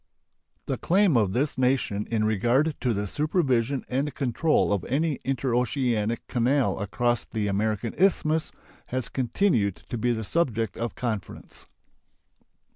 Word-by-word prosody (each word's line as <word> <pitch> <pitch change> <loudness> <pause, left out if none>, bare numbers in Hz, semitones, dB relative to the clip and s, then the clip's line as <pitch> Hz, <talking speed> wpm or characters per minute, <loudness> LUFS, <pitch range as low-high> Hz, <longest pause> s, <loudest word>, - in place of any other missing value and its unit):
The - - -3
claim 190 -3 +3
of 105 -5 +3
this 135 +1 -1
nation 125 -5 +1
in 110 -2 +1
regard 120 +9 +2
to 125 - +1
the 105 -2 -1
supervision 135 - 0
and 135 +2 -2
control 135 -1 +1
of 100 -4 -1
any 150 +3 0
interoceanic 125 -3 0
canal 125 +1 +1
across 120 +4 0
the 110 -2 -3
American 105 +2 -1
Isthmus 160 -4 +2 0.4
has 130 0 -3
continued 120 - +1
to 110 +7 -7
be 120 +2 +1
the 110 -1 -2
subject 115 - 0
of 115 0 -4
conference. 110 -5 -5
120 Hz, 130 wpm, -26 LUFS, 110-140 Hz, 0.4 s, claim